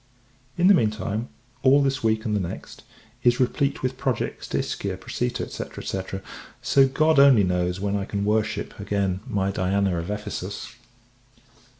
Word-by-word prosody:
In 175 - +3
the 200 - +8
mean 115 - +4
time, 110 +2 -4 0.3
all 140 +2 +5
this 135 -1 0
week 110 0 +1
and 105 -2 0
the - - +1
next, 90 -3 -6 0.4
is 120 +1 +3
replete 140 +2 0
with 130 0 -2
projects 130 -2 -2
to - - -2
Ischia, - - -2
Procita, - - -3
&c. - - -5 0.4
&c. 95 +1 -6 0.4
so 135 -1 +4
God 155 +3 +3
only 135 -7 +7
knows 90 0 0
when 100 +1 -1
I 100 -1 -1
can 100 0 -2
worship, 105 0 -1
again, 100 -2 -1
my 100 -1 0
Diana 95 -1 +1
of 85 +3 -5
Ephesus. 105 0 -5
105 Hz, 165 wpm, -24 LUFS, 100-130 Hz, 0.4 s, the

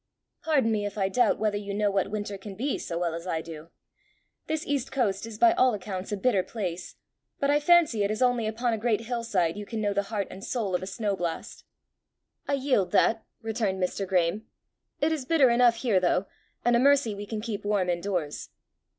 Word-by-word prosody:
"Pardon 275 -8 +2
me 210 -1 0
if 205 - -8
I 190 -1 +1
doubt 245 +3 +3
whether 210 -1 0
you 200 -1 -5
know 205 -1 +1
what 195 0 0
winter 205 -1 -4
can 195 0 -9
be 265 +7 -2
so 170 - -4
well 170 -1 -1
as 170 +2 -6
I 165 -3 -1
do. 165 0 -10 0.8
This 315 0 -2
east 280 -3 -2
coast 220 -5 0
is 220 -2 -8
by 340 +8 +6
all 255 -8 +3
accounts 190 -1 -6
a 205 - -1
bitter 200 -2 +2
place, 180 -4 -5 0.4
but 280 0 +2
I 295 - +4
fancy 310 -8 +4
it 200 - +1
is 215 +1 -2
only 245 -3 +2
upon 230 +2 -1
a 220 - -2
great 230 -1 +1
hill 235 0 -3
side 180 -6 0
you 210 - -5
can 225 - -4
know 205 -1 0
the 200 - +1
heart 205 -4 -2
and 195 - -9
soul 220 -7 -2
of 180 - +1
a 185 - -5
snow 205 0 -2
blast." 170 -3 -5 0.8
"I 280 - 0
yield 260 -9 +1
that," 225 0 +3 0.2
returned 220 -4 -1
Mr. 190 +1 -2
Graeme. 185 +3 0 0.3
" - - -48
It 305 +2 +2
is 310 -4 -1
bitter 270 -3 +4
enough 240 0 +5
here 225 -5 +2
though, 180 +1 +1 0.4
and 240 0 +4
a - - +4
mercy 275 -4 +4
we 205 0 -7
can 220 0 -4
keep 215 -2 -4
warm 205 -3 +1
in 175 -1 0
doors." 175 -7 -3
210 Hz, 225 wpm, -27 LUFS, 190-240 Hz, 0.8 s, by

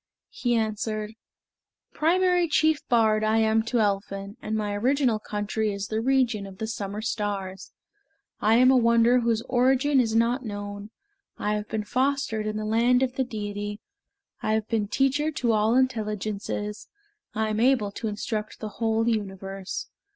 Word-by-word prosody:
He 245 -2 0
answered: 215 -1 -2 0.8
"Primary 355 +2 +2
chief 310 0 +2
bard 220 -2 +3
I 215 +1 +2
am 220 0 +3
to 240 +1 0
Elphin, 200 -1 -1
And 215 - -3
my 210 -1 -1
original 245 +1 +1
country 210 +1 -2
is 200 0 -5
the 220 0 -1
region 245 -5 +1
of 190 -1 -12
the 220 - -3
summer 210 -1 -4
stars; 200 -4 -3 0.7
I 215 +2 +3
am 255 +2 +6
a - - +5
wonder 235 +1 +4
whose 230 -1 0
origin 265 +3 +2
is 225 -3 +1
not 235 +3 +2
known; 205 -1 -6 0.5
I 210 - -1
have 210 0 -3
been 215 -1 -2
fostered 255 -2 0
in 215 0 -2
the 215 - -3
land 240 +4 +3
of 255 -1 -1
the 265 - 0
Deity, 205 -3 -5 0.6
I 215 - 0
have 220 0 0
been 220 -3 0
teacher 270 +6 +1
to 240 -4 0
all 215 +2 +2
intelligences, 210 -4 -2 0.5
I 220 0 0
am 215 0 -1
able 240 -4 +3
to 220 - -5
instruct 210 +1 -4
the 215 - -5
whole 225 +2 0
universe. 195 -3 -3
220 Hz, 160 wpm, -26 LUFS, 210-245 Hz, 0.8 s, am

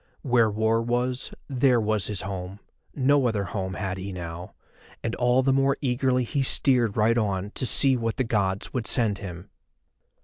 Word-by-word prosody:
Where 120 -5 +3
war 110 +2 +1
was, 125 +2 -2 0.2
there 130 -2 +2
was 110 -3 0
his 105 -3 -2
home, 95 0 -6 0.4
no 140 -1 +3
other 105 -4 -1
home 95 0 -4
had 95 -2 -4
he 100 +1 -6
now, 85 -1 -8 0.5
and 115 - -2
all 125 +2 +2
the 135 0 +2
more 135 +1 +2
eagerly 130 -1 0
he 135 +4 -2
steered 125 -5 +2
right 115 +2 +3
on 100 -2 -2
to 130 - -1
see 135 +1 +5
what 115 -1 -2
the 130 - +1
Gods 100 -4 -1
would 120 -3 -2
send 110 -5 +2
him. 90 -2 -9
115 Hz, 175 wpm, -25 LUFS, 100-125 Hz, 0.5 s, see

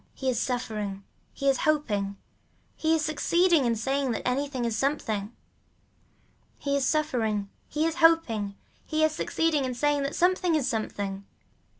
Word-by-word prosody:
He 265 -1 0
is 235 - -1
suffering, 210 -6 -3 0.3
he 275 - -3
is 270 -1 +4
hoping, 205 -10 0 0.6
he 320 0 +2
is 310 -1 0
succeeding 330 0 +3
in 235 -1 +2
saying 270 +4 0
that - - -3
anything 260 -1 -1
is 230 -2 -1
something. 220 -5 -1 1.3
He 280 -1 -1
is 275 -1 +1
suffering, 225 -10 0 0.2
he 305 +1 -1
is 330 0 -1
hoping, 255 -12 +3 0.3
he 315 0 0
is 315 - +4
succeeding 310 -1 0
in 255 -1 -2
saying 290 +2 +1
that 275 +1 -2
something 360 -1 +2
is 285 -4 +1
something. 205 -4 -3
275 Hz, 155 wpm, -27 LUFS, 220-310 Hz, 1.3 s, is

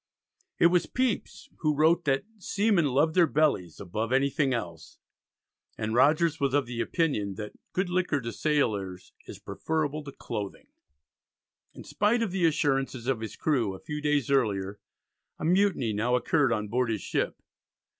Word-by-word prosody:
It - - +4
was 180 - +2
Pepys 255 -4 -2
who 150 -2 +1
wrote 160 +4 +3
that 135 -1 +1 0.2
"seamen 200 -3 +2
love 145 +4 +2
their 175 -1 +5
bellies 140 - +1
above 110 +5 -3
anything 135 +1 +2
else," 85 -10 -5 0.8
and 110 0 -2
Rogers 155 +6 +3
was 140 -1 +1
of 145 -2 +2
the 120 -1 -4
opinion 110 - -1
that 105 +1 -7 0.2
"good 185 +1 0
liquor 180 -5 0
to 115 -1 -4
sailors 105 - -1
is - - -8
preferable 155 -1 -3
to 140 - -7
clothing." 105 -7 -6 1.1
In - - -10
spite 230 +3 +1
of 210 - -2
the 180 -3 +2
assurances 135 -5 0
of 130 -3 0
his 110 -2 -6
crew 120 -11 0
a - - -10
few 150 0 -5
days 145 -3 +1
earlier, 100 -6 0 0.6
a - - -5
mutiny 180 - +2
now 115 +4 +1
occurred 135 +1 +2
on 105 -2 -1
board 120 +3 0
his 110 -3 -2
ship. - - -2
140 Hz, 160 wpm, -28 LUFS, 110-160 Hz, 1.1 s, their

